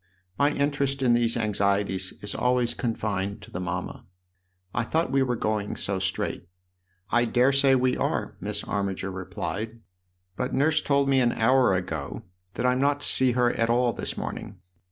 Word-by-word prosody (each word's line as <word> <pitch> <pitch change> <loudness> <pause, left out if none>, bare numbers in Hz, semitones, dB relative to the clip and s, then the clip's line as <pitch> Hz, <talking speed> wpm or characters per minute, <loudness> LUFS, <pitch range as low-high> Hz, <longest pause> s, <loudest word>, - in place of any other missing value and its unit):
" 90 0 -36
My 145 - +4
interest 140 -2 0
in 120 -2 +4
these 120 0 +2
anxieties 100 -3 +1
is 105 - 0
always 125 -1 +1
confined 105 -3 -3
to - - -13
the 90 - -4
mamma. 90 0 -4 0.7
I - - 0
thought 160 +4 0
we 135 0 +3
were 125 -2 +1
going 105 -2 -2
so 95 -1 -2
straight." 95 -2 -2 0.3
" 90 +1 -43
I 120 0 +3
dare 125 +3 +3
say 135 -1 +4
we 130 0 +2
are," - - -2
Miss 105 +2 -2
Armiger 95 -1 -2
replied. 95 +4 -5 0.3
" 90 0 -47
But 125 +1 -2
Nurse 155 +4 +3
told 140 -1 +2
me 135 -1 +4
an 120 -2 +3
hour 120 -2 +3
ago 90 +4 -4 0.3
that 120 - -2
I'm 125 0 +2
not 145 +1 +2
to - - 0
see 130 -2 +4
her 120 0 +2
at 115 0 0
all 120 0 +2
this - - -4
morning. 100 - -6
115 Hz, 185 wpm, -26 LUFS, 95-130 Hz, 0.7 s, My